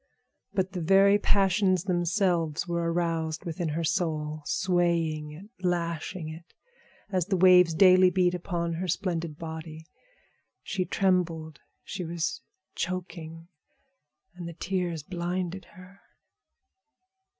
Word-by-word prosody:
But 190 -1 -1
the 180 - -4
very 195 +4 +5
passions 195 -2 +2
themselves 175 -3 0
were 170 -1 -1
aroused 165 -2 -1
within 170 0 -3
her 160 +3 -2
soul, 155 -2 -1
swaying 170 -4 0
it, 180 +8 -12
lashing 170 -1 -2
it, 160 +2 -10 0.6
as 185 -3 0
the 195 -2 +1
waves 180 -2 +6
daily 185 +1 +7
beat 180 -1 +2
upon 170 -1 -2
her 180 +3 -3
splendid 165 -3 -2
body. 160 -1 -7 0.8
She 185 -3 -2
trembled, 170 -5 0 0.2
she 190 -2 -5
was 170 -1 -3 0.3
choking, 170 -2 -5 0.9
and 175 -1 -8
the 170 - -7
tears 175 -4 -2
blinded 180 +2 -3
her. 185 +2 -14
175 Hz, 115 wpm, -28 LUFS, 165-185 Hz, 0.9 s, daily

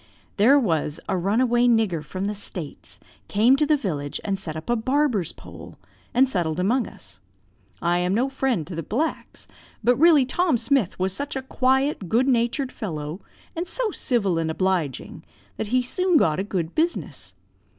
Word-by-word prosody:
"There 240 +8 +6
was 160 - 0
runaway 235 +7 +2
nigger 220 -9 +2
from 185 +6 -5
the 205 - -1
States 180 -6 -7 0.3
came 225 +6 +4
to 300 - +2
the 305 0 +4
village, 145 - -3
and 195 -2 -1
set 160 -5 -6
up 155 - -7
a 240 - +2
barber's 245 - +1
poll, - - -12 0.3
and 260 +2 +4
settled 175 -8 -1
among 225 +5 +1
us. 95 0 -12 0.6
I 175 +1 +2
am 180 +2 0
no 250 +4 +2
friend 265 - -1
to 180 - -8
the 165 - -3
blacks; 260 - -3 0.4
but 245 +3 +4
really 310 -3 +6
Tom 320 +1 +1
Smith 230 -3 +1
was 185 0 0
such 285 +9 -3
a 265 - -3
quiet, 265 - 0
good 245 +7 +2
natured 250 +2 +1
fellow, 155 -3 -5 0.3
and 340 +2 -3
so 470 +3 0
civil 200 - 0
and 160 -1 -1
obliging, 170 -5 -2 0.3
that 220 - -3
he 250 +3 +1
soon 365 +6 +2
got 155 - +2
a - - 0
good 180 -5 -3
business. 335 +2 -2
220 Hz, 170 wpm, -24 LUFS, 175-265 Hz, 0.6 s, There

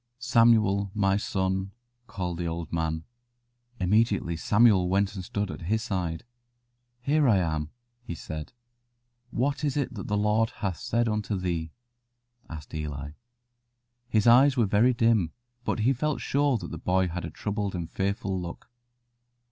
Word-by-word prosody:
"Samuel, 115 -5 +3
my 95 -2 +2
son," 95 -1 -1 0.3
called 90 -5 -4
the 85 - -1
old 85 -1 -5
man. 80 -1 -1 0.8
Immediately 100 -2 +2
Samuel 100 -1 +4
went 100 +2 +1
and 95 -3 -6
stood 100 +2 -3
at - - -8
his 110 +1 +1
side, 90 -7 -2 0.8
"Here 145 +3 +2
am 85 -8 +2
I," - - -15 0.3
he 90 -8 -6
said. 80 -1 -7 0.8
"What 140 +5 -1
is 145 -1 0
it 135 -3 -1
that 100 -5 -6
the 105 - 0
Lord 105 +2 +2
hath 95 -5 -3
said 120 +1 0
unto 105 -2 -1
thee?" 85 -3 -2 0.8
asked 80 -2 -9
Eli. 75 -2 -4 1.0
His 110 -3 +2
eyes 130 +3 +6
were 120 - +4
very 110 +5 +3
dim, 115 -8 +2 0.3
but 110 - -1
he 125 +5 +3
felt 150 +3 -1
sure 140 -2 +1
that - - -7
the - - -6
boy 95 0 +1
had 90 +1 -4
a 85 - -4
troubled 100 +2 -3
and 85 -2 -3
fearful 95 +1 -2
look. 85 +6 -8
100 Hz, 155 wpm, -27 LUFS, 90-115 Hz, 1.0 s, eyes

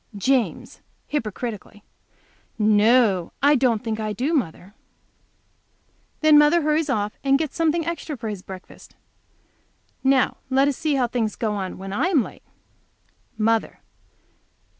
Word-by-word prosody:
James, 260 +3 -1 0.2
hypocritically. 215 -5 -5 0.7
"No, 215 -3 +3
I 290 +1 +6
don't 245 -4 +1
think 220 -2 -3
I 215 -1 -2
do, 260 - -1
mother." 195 - -2 1.5
Then 310 -1 +7
mother 300 +3 +4
hurries 305 0 +1
off 210 -5 -1
and 275 0 +3
gets 310 -1 -4
something 330 0 +1
extra 330 -3 -4
for 230 -1 -6
his 205 -3 -5
breakfast. 185 -1 -12 1.1
Now 265 -1 +2
let 270 +1 +3
us 285 - 0
see 300 +1 -1
how 260 -2 +2
things 230 -3 -2
go 220 -2 -2
on 190 -2 -4
when 195 0 -7
I 275 - +1
am 315 -10 +3
late. - - -11 1.0
Mother. 225 0 0
245 Hz, 135 wpm, -23 LUFS, 210-290 Hz, 1.5 s, Then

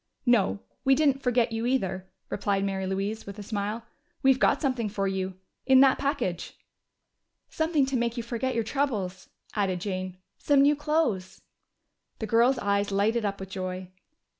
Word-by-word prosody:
"No, 215 -4 +3 0.2
we 270 -1 +5
didn't 280 -2 +2
forget 245 -2 +2
you, 225 +1 -1
either," 190 -7 -1 0.2
replied 200 -1 0
Mary 190 -1 -2
Louise, 200 +3 -3
with 200 +1 -8
a 205 - -7
smile. 210 +2 -3 0.4
"We've 265 -1 +5
got - - +3
something 255 -7 -1
for 195 -1 -1
you 190 -1 -2 0.3
in 265 -1 +7
that 270 -1 +5
package." 250 - -2 0.9
"Something 315 -3 +1
to 265 0 -2
make 235 0 0
you 235 - -2
forget 240 +2 -2
your 230 - +1
troubles," 215 -8 -2 0.2
added 195 -4 0
Jane. 185 -1 -4 0.2
"Some 280 -1 +4
new 290 +1 +5
clothes." 290 - -1 0.7
The 220 - -4
girl's 235 +4 +3
eyes 200 -2 0
lighted 215 +3 +1
up 200 -1 -2
with 190 0 -7
joy. 185 -1 -5
220 Hz, 165 wpm, -27 LUFS, 195-260 Hz, 0.9 s, in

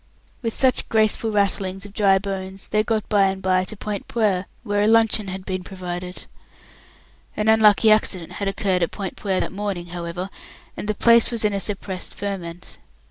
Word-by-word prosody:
With 230 -2 -3
such 260 -2 +2
graceful 220 0 +3
rattlings 195 -2 0
of 200 - -11
dry 200 -3 +4
bones, 195 -1 -5
they 215 - +2
got 215 -1 -1
by 205 -2 +4
and 190 0 -1
by 185 -1 +1
to 215 - -6
Point 205 -1 -5
Puer, 200 -5 0 0.2
where 205 -3 0
a 210 - +3
luncheon 225 -2 +3
had 190 0 -6
been 185 -1 -3
provided. 180 -1 -6 1.1
An 210 - 0
unlucky 220 0 +6
accident 190 -5 +1
had 200 - 0
occurred 195 -2 0
at 170 - +1
Point 195 -3 -5
Puer 190 -3 -1
that - - -2
morning, 195 -3 -4
however, 175 +2 -5 0.4
and - - -6
the 215 - 0
place 235 +1 +5
was 230 -3 -2
in 210 - +2
a 200 - 0
suppressed 195 -2 -3
ferment. 180 -4 -5
200 Hz, 185 wpm, -22 LUFS, 185-215 Hz, 1.1 s, unlucky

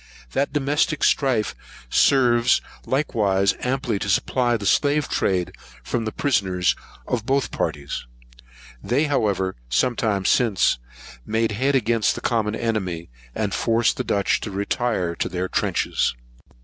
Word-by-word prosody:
That 140 +1 0
domestic 145 +1 0
strife 130 -6 +2 0.3
serves 120 - +4 0.3
likewise 100 -8 +1
amply 125 -4 -1
to 100 - -3
supply 120 +4 +1
the 105 - -7
slave 145 +5 +2
trade 90 -2 0 0.3
from 115 - -2
the 110 - -2
prisoners 95 -11 +1 0.3
of 115 -2 -2
both 135 -3 +1
parties. 70 -3 -3 0.7
They, 130 - +1
however, 100 - 0
some 120 - +2
time 100 -5 0
since, 110 - +3 0.4
made 110 - 0
head 135 +7 +1
against 115 -4 +2
the - - -6
common 110 -2 0
enemy, 95 - -3 0.2
and 105 -3 -1
forced 115 +3 +1
the - - -1
Dutch 100 -1 +1
to - - -5
retire 100 -1 -1
within 85 - -4
their 90 +1 -1
trenches. - - 0
115 Hz, 135 wpm, -23 LUFS, 95-130 Hz, 0.7 s, serves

